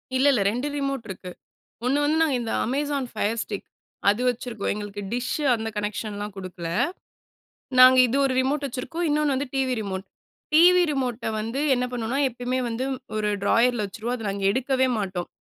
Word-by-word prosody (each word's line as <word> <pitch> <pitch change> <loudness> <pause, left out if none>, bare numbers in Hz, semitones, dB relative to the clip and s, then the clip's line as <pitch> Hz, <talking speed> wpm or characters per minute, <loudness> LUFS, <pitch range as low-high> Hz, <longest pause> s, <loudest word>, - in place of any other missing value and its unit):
இல்ல, 260 - +3
இல்ல. 240 - +2
2 250 +5 -2
ரிமோட் 275 -4 -2
இருக்கு. 185 -1 -7 0.6
1 275 +3 +2
வந்து 310 +2 +2
நா 325 - +4
இந்த 230 - -4 0.2
"அமேசான் 280 +1 -1
ஃபயர் 220 +1 -1
ஸ்டிக்" 205 -2 -6 0.4
அது 210 +4 +3
வச்சுருக்கோம். 240 -3 -2
எங்களுக்கு 205 -1 -6
டிஷ்ஷு 250 +5 -2
அந்த 225 0 -3
கனெக்ஷன்லாம் 210 0 -3
குடுக்கல. 180 -3 -6 1.1
நாங்க 255 0 +9
இது 260 +4 0
1 265 - +1
ரிமோட் 280 +2 0
வச்சுருக்கோம். 270 +7 -4
இன்னொன்னு 295 -1 +2
வந்து 275 +2 -2
டிவி 265 -1 +1
ரிமோட். 190 -1 -4 0.5
டிவி 355 +3 +7
ரிமோட்ட 250 -4 -2
வந்து 230 +5 -3 0.2
என்ன 250 0 0
பண்ணுவோம்ன்னா, 245 +2 -2
எப்பயுமே 245 +2 -2
வந்து 230 +3 -2 0.3
ஒரு 210 -1 0
ட்ராயர்ல 235 0 +3
வச்சுருவோம், 220 +5 -4
அத 225 - -7
நாங்க 195 0 -4
எடுக்கவே 260 +1 +1
மாட்டோம். 185 -3 -3
245 Hz, 165 wpm, -25 LUFS, 210-270 Hz, 1.1 s, நாங்க